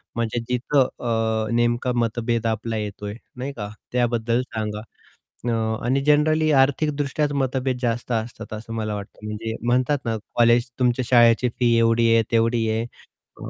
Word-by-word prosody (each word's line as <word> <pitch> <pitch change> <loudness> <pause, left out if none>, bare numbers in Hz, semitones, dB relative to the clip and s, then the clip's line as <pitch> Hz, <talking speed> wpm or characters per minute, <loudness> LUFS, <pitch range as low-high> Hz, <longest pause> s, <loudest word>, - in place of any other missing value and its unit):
म्हणजे 115 0 -1
जिथं 125 +2 +2
अ, 110 -2 -1
नेमका 120 +1 +1
मतभेद 115 0 -1
आपला 110 0 -2
येतोय 105 -1 -5 0.2
नाही 135 +3 -4
का, 105 -2 -4 0.2
त्याबद्दल 120 -1 +1
सांगा 110 -4 -4 0.7
अ, 120 - 0 0.4
आणि 135 +3 +2
जनरली 155 +1 +3
आर्थिकदृष्ट्याच 145 +1 +1
मतभेद 130 -2 -1
जास्त 120 0 -2
असतात 115 -1 -3
असं 110 +1 -7
मला 110 -2 -2
वाटतं. 100 +1 -9
म्हणजे 110 +1 -4
म्हणतात 125 +4 +2
ना 115 -1 -1 0.2
कॉलेज 120 +1 +4
तुमच्या 125 0 +1
शाळेची 120 0 +5
फी 120 -1 +3
एवढी 115 0 +3
आहे, 115 - +4
तेवढी 115 0 +2
आहे 110 +1 0 0.6
अ, - - -6
120 Hz, 145 wpm, -23 LUFS, 115-125 Hz, 0.7 s, शाळेची